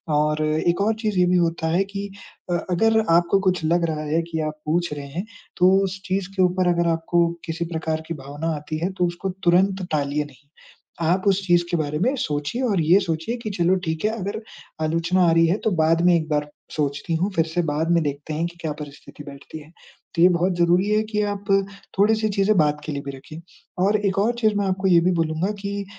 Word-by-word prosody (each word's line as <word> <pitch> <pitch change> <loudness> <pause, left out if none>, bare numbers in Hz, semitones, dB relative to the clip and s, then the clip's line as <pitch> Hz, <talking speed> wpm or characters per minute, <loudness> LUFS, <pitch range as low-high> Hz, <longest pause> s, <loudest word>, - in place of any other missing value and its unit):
और 150 +1 +1
एक 165 +4 +1
और 215 +2 +2
चीज़ 210 -4 0
ये 180 - +5
भी 180 - +3
होता 165 -1 0
है 180 +4 +2
कि 200 0 -6 0.4
अ, - - +2 0.2
अगर 220 +5 +3
आपको 170 +3 +4
कुछ 180 -2 -2
लग 170 +2 +2
रहा 155 -1 -4
है 165 - +3
कि 160 - -2
आप - - -7
पूछ 170 +1 0
रहे 145 -1 -7
हैं 170 +8 -5 0.3
तो 180 +1 +5
उस 195 0 -4
चीज़ 190 0 -2
के 190 - +1
ऊपर 180 0 +2
अगर 170 0 +1
आपको 170 +1 +1 0.2
किसी 165 0 -3
प्रकार 160 0 -2
की 170 - -3
भावना 150 +4 -3
आती 150 +1 -5
है 185 - 0
तो 180 - +3
उसको 175 +3 -4
तुरंत 185 +1 +2
टालिए 145 0 0
नहीं। 140 -1 -18 0.5
आप 175 +3 +1
उस 195 0 +3
चीज़ 175 -1 +4
के 175 - +1
बारे 150 -1 -2
में 255 +7 +2
सोचिए 150 - -2
और 205 -8 +1
ये 170 +5 +5
सोचिए 165 +6 -2
कि 215 - -3
चलो 175 +2 +3
ठीक 160 +3 -2
है, 215 - +2
अगर 200 +3 -4 0.4
आलोचना 170 +3 +2
आ - - +3
रही 165 0 +5
है 175 +5 +1
तो 220 - +3
बाद 165 +1 +3
में 180 - +6
एक 160 -2 -1
बार 150 -1 -1 0.3
सोचती 145 +2 -1
हूँ। 185 +5 0
फिर 165 - +3
से 170 +2 -1
बाद 160 +2 -1
में 170 -1 +3
देखते 145 +1 -4
हैं 165 +2 -1
कि 170 0 -13
क्या 160 - -2
परिस्थिति 145 0 -11
बैठती 140 +2 -10
है, 150 +1 -15 0.4
तो 165 - +1
ये 180 - +8
बहुत 180 +1 +1
ज़रूरी 175 +3 +3
है 215 +1 +3
कि 215 -1 -2
आप 205 0 -3
अ, 195 0 +5 0.4
थोड़ी-सी 215 +1 +3
चीज़ें 200 0 +2
बाद 150 -2 +2
के 155 - -4
लिए 140 - -3
भी 140 - -4
रखिए। 155 +4 -11 0.4
और 210 +2 +3
एक 195 - -1
और 220 +4 +2
चीज़ 215 -2 +2
मैं 205 0 0
आपको 190 0 0
ये 175 -2 +6
भी 180 +2 +2
बोलूँगा 165 +2 0
कि 200 0 -4
170 Hz, 235 wpm, -23 LUFS, 155-195 Hz, 0.5 s, ये